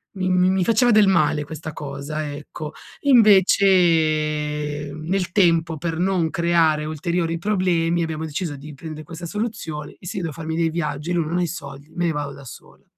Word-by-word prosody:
mi 185 -1 -1
mi 180 0 +3
mi 190 0 +2
faceva 230 +5 +3
del 210 -2 +6
male 155 -5 +2
questa 155 +1 -7
cosa, 145 +1 -5
ecco. 150 +1 -7 0.3
Invece 160 - +3
nel 170 +3 -2
tempo 170 -4 +2
per 165 +1 -3
non 180 -3 +1
creare 165 -3 +2
ulteriori 165 +2 -1
problemi 175 -3 +1
abbiamo 160 -1 -3
deciso 155 0 -4
di 145 +2 -10
prende 155 +1 -8
questa 170 +1 -8
soluzione 170 -7 -5
e - - -15
se 200 - -5
io 185 - -2
devo 160 -3 -3
farmi 160 +2 -5
dei 165 0 +1
viaggi 155 -1 -3
e - - +1
lui 170 -2 +1
non 170 +3 -2
ha - - +1
i - - 0
soldi, 140 -3 -8
me 175 - 0
ne 170 - +2
vado 145 -2 -3
da 140 0 -12
sola, - - -13
165 Hz, 190 wpm, -22 LUFS, 150-180 Hz, 0.3 s, del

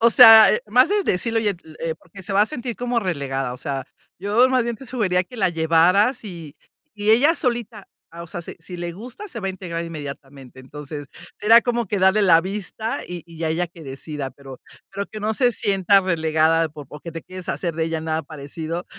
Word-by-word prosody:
O 235 +1 +5
sea, 225 -2 +10 0.2
más 250 - +4
es 410 -2 +1
decírle: 225 +5 0
"Oye", 205 -4 0 0.2
eh, 165 -1 -2
porque 190 +3 -14
se 190 +2 -5
va 200 +1 +5
a - - +1
sentir 245 -4 -5
como 245 -1 -1
relegada. 135 - -2
O - - -9
sea, 135 -1 -4 0.3
yo 210 +7 +3
más 255 -2 +2
bien 235 -1 -3
te 270 - -12
sugeriría 205 -7 0
que 250 - -13
la 195 -4 +2
llevaras 175 +9 +3
y 165 -6 -9 0.4
y 210 +1 0
ella 285 +9 +5
solita, 235 - -3 0.2
ah, 170 +1 -9
o 170 - -9
sea, 170 +1 -7
si - - -9
si 175 +2 -9
le 175 0 -5
gusta, 245 - -9
se 230 - -7
va 195 - -4
a 190 - 0
integrar 170 -3 -5
inmediatamente. 140 -4 -9
Entonces, 145 +2 -8 0.3
será 225 +3 +7
como 240 -1 -1
que 200 +1 -2
darle 190 +3 +4
la 165 -4 +6
vista, 205 +4 -4
y 175 -2 -7
y 165 -1 -14
ya 160 -1 -1
ella 170 +3 0
que 165 -1 -14
decida, 135 0 -6
pero 135 -2 -12 0.3
pero 200 +1 -4
que 215 - -9
no 215 +1 0
se 245 0 +2
sienta 195 -2 +3
relegada, 160 -2 +2
por 150 -2 -11
porque 150 +3 -9
te 165 0 -7
quieres 185 -1 -9
deshacer 170 -3 -2
de 160 0 -1
ella 165 -1 -2
nada 160 0 -2
parecido, 155 +4 -6
180 Hz, 220 wpm, -22 LUFS, 160-220 Hz, 0.4 s, sea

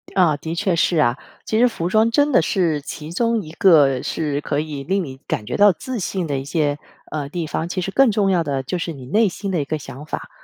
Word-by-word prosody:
啊， 175 -6 +4
的 160 +3 -5
确 190 0 +1
是 170 +1 +2
啊。 130 -4 +3 0.3
其 220 - 0
实 245 - +6
服 175 -8 -3
装 220 +4 +3
真 290 +4 +3
的 255 - +5
是 165 -6 0
其 150 +2 -8
中 230 +4 +1
一 155 -5 -10
个 150 -7 +4
是 145 -2 -2
可 145 -1 -1
以 150 -2 -4
令 190 +6 0
你 130 -4 -8
感 105 - -2
觉 120 - -4
到 205 0 +7
自 240 +7 -5
信 185 -1 -2
的 140 -2 -1
一 135 - -4
些， 145 -1 0 0.3
呃， 145 -2 -3
地 170 +1 -4
方， 160 +2 -3
其 185 - -2
实 195 - -3
更 270 +2 +4
重 205 -1 +1
要 175 -3 +2
的 140 -3 -2
就 155 +7 -3
是 170 0 -3
你 135 -4 -10
内 210 - +2
心 195 +2 -5
的 175 -5 0
一 - - -3
个 155 +2 -2
想 135 0 -10
法， - - -6
165 Hz, 275 characters per minute, -21 LUFS, 145-195 Hz, 0.3 s, 到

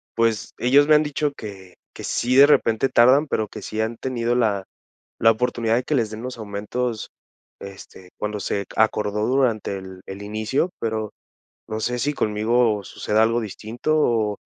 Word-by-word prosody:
pues, 115 -3 0
ellos 140 +4 +4
me 155 - +6
han 150 - +4
dicho 150 0 -1
que 95 -4 -10 0.2
que - - -10
sí 125 +1 0
de 140 +2 +8
repente 115 -4 +3
tardan, 130 +6 +5
pero 110 -6 -1
que - - -9
sí 110 0 -3
han 115 +1 -2
tenido 120 -2 -1
la 105 -5 +1 0.5
la 115 - +5
oportunidad 115 -1 0
de 125 - 0
que 155 - -1
les 115 -6 +1
den 110 +1 -7
los 125 -1 -6
aumentos, 110 +3 -4 0.5
este, 95 -1 -11
cuando 105 -1 -3
se 100 0 -2
acordó 105 -1 +1
durante 120 -6 +1
el 95 -1 -9
el 95 +1 -8
inicio. 110 - -1
Pero 110 -2 -2 0.6
no 110 0 -3
sé 125 +2 -1
si 145 +5 -1
conmigo 110 -1 +1
suceda 110 +1 0
algo 115 +1 +1
distinto 115 +8 -3
o 110 -7 +1
110 Hz, 175 wpm, -22 LUFS, 105-125 Hz, 0.6 s, de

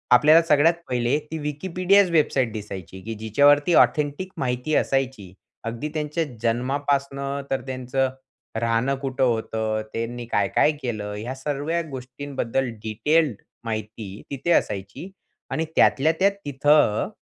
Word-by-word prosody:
आपल्याला 155 +5 +7
सगळ्यात 155 +2 +5 0.2
1ले 125 +2 +1
ती 160 - -3
Wikipedia 185 +5 +2
वेबसाईट 140 -7 +2
दिसायची 95 -3 -7
की 115 - -5
जिच्यावरती 145 +9 +4
ऑथेंटिक 150 +5 -2
माहिती 125 +3 -1
असायची. 130 -9 -1 0.3
अगदी 115 +6 -4
त्यांच्या 155 +2 -1 0.2
जन्मापासून 140 +3 -1
तर 135 - 0
त्यांचं 130 +1 -1 0.5
राहणं 115 +4 +1
कुठं 135 -1 -1
होतं? 110 -2 0
त्यांनी 120 +1 -4
काय-काय 100 +9 +3
केलं? 105 -4 -4
ह्या 115 +5 -5
सगळ्या 145 +5 -2
गोष्टींबद्दल 130 -1 -3
डिटेल्ड 140 +3 +1 0.2
माहिती 110 -2 -5
तिथे 140 +5 -2
असायची 100 - -1 0.4
आणि 160 0 -1
त्यातल्या-त्यात 160 +8 +4
तिथं, 145 -4 +3
135 Hz, 115 wpm, -24 LUFS, 115-150 Hz, 0.5 s, आपल्याला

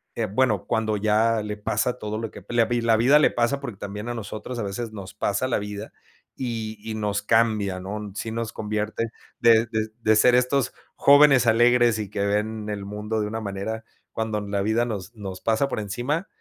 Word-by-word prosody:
Eh, 115 - 0
bueno, 105 -1 +1
cuando 110 -1 0
ya 110 +2 +2
le 105 0 -4
pasa 110 +4 -1
todo 105 0 -4
lo 115 -1 -4
que - - -11
la 120 -1 +3
vi 120 +1 0
la 115 -1 +3
vida 135 +6 +5
le - - +5
pasa, 120 +4 +1
porque 120 -8 -7
también 105 +3 -6
a - - -2
nosotros 115 +2 -6
a 115 - -2
veces 105 +3 -4
nos 100 -3 -9
pasa 105 +6 -1
la 130 - +1
vida 105 +1 -7 0.4
y, 115 -4 -4
y 110 0 -5
nos 105 -1 -1
cambia, 110 -5 +2
¿no,? 105 +2 -6
sí 110 +1 -4
nos 115 0 -3
convierte 105 +1 -2 0.3
de 115 0 +5
de, 110 -1 -2
de 110 -1 +4
ser 125 +3 +5
estos 125 +1 +2 0.2
jóvenes 140 -3 +6
alegres, 120 0 +4
y 105 -3 -4
que 100 -1 -1
ven 105 +1 -1
el 100 -1 -4
mundo 105 +2 -3
de 105 - -1
una 110 +1 -4
manera, 105 +2 -4 0.3
cuando 110 -1 -2
la 100 -1 -2
vida 110 +3 +2
nos 105 -2 -5
nos 95 -3 -7
pasa 115 +4 +1
por - - -2
encima, 125 - -2
110 Hz, 205 wpm, -24 LUFS, 105-120 Hz, 0.4 s, jóvenes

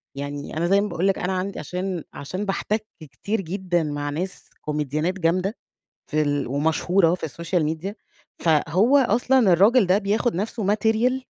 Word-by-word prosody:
يعني 145 +2 -5
أنا 170 +2 +1
زي 195 +2 +4
ما 210 - -1
باقول 180 +1 0
لِك 195 - +1
أنا 185 +1 -1
عند 185 +2 -3
عشان 180 +2 -4
عشان 185 +8 -5
باحتك 210 +2 -1
كتير 195 +8 -4
جدًا 180 -1 -1
مع 145 -1 -3
ناس 175 +6 -4
كوميديانات 150 +3 -1
جامدة، 185 +6 0 0.5
في 155 0 +2
ال 145 -1 0
ومشهورة 160 +6 +2
في 175 - -5
الSocial 170 +2 -1
Media، 180 +6 -6 0.5
فهو 175 - +3
أصلًا 255 +1 +3
الراجل 205 +4 +5
ده 185 +2 +4
بياخد 210 +2 0
نَفسه 210 +2 -2
material، 225 +5 +1
185 Hz, 160 wpm, -23 LUFS, 155-205 Hz, 0.5 s, الراجل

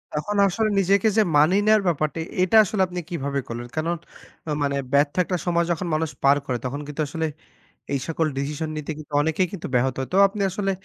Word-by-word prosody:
তখন 205 +8 -2
আসলে 215 +4 0
নিজেকে 195 +2 +3
যে - - +7 0.2
মানিয়ে 180 +8 +4
নেওয়ার 215 -1 +5
ব্যাপারটা, 155 -2 0 0.2
এটা 185 +4 +4
আসলে 210 -1 -1
আপনি 180 0 -5
কিভাবে 140 -5 -2
করলেন? 120 +1 -6
কারণ, 165 +2 0 0.5
অ্যা 155 - -2
মানে 140 0 0 0.2
ব্যর্থ 145 +1 +3
একটা 180 +1 -2
সময় 170 -1 +2
যখন 175 +1 -2
মানুষ 160 0 -1
পার 140 +1 +5
করে, 125 -2 -1
তখন 135 +3 -3
কিন্তু 150 +1 -4
আসলে 160 +3 -3 0.7
এই 140 - 0
সকল 165 0 0
ডিসিশন 150 +3 -3
নিতে 150 0 -5
কিন্তু 155 -1 -12
অনেকেই 160 +4 +1
কিন্তু 195 - -6
ব্যাহত 125 +1 +2
হয়। 130 - -3
তো - - +3
আপনি 200 +1 -7
আসলে 195 +1 -2
160 Hz, 205 wpm, -23 LUFS, 145-185 Hz, 0.7 s, যে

